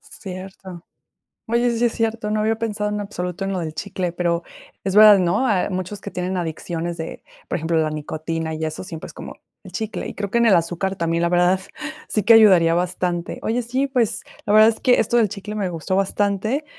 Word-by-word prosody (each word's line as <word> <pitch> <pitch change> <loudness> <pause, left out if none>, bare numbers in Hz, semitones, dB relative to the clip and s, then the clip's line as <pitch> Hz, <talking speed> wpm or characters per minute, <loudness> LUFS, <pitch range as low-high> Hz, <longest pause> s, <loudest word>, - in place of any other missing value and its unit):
Cierto. 185 -2 -9 0.6
Oye, 235 +2 +2
sí 240 - +2
es 235 - +1
cierto, 225 -2 -1
no 215 - 0
había 220 +1 +1
pensado, 210 -2 -2
en 210 0 -2
absoluto, 180 -2 -4
en 195 - -2
lo 185 - -2
del 160 -2 -4
chicle, 180 0 -3
pero 170 -1 -1 0.4
es 195 +1 -2
verdad, 210 -2 +9
¿no? 185 +8 +1
Hay 205 -5 +1
muchos 185 +1 -4
que 200 - -6
tienen 180 0 -3
adicciones 170 0 -4
de, 160 - -7 0.2
por - - -1
ejemplo, 165 +1 0
la 155 -1 +1
nicotina 160 +1 -4
y 160 0 -3
eso, 155 +3 -5
siempre 165 -4 -8
es - - -12
como, - - -9 0.3
el - - -12
chicle. 220 -1 -4
Y - - -7
creo 200 -1 -3
que 235 - +2
en 235 - +4
el 195 - +6
azúcar 175 +3 -1
también, 170 0 -1
la 170 - +2
verdad, 180 +1 +3 0.5
sí 210 - 0
que 230 - +7
ayudaría 185 -7 +6
bastante. 175 -1 -2
Oye, 240 +3 0
sí, 255 +4 -1
pues, 245 -5 0 0.3
la 205 - +2
verdad 215 +1 +8
es 225 - -3
que 250 - +4
esto 235 +2 +2
del 220 -4 +3
chicle 210 +1 -7
me 195 -3 -1
gustó 170 +2 -3
bastante, 205 +8 0
190 Hz, 220 wpm, -21 LUFS, 170-215 Hz, 0.6 s, verdad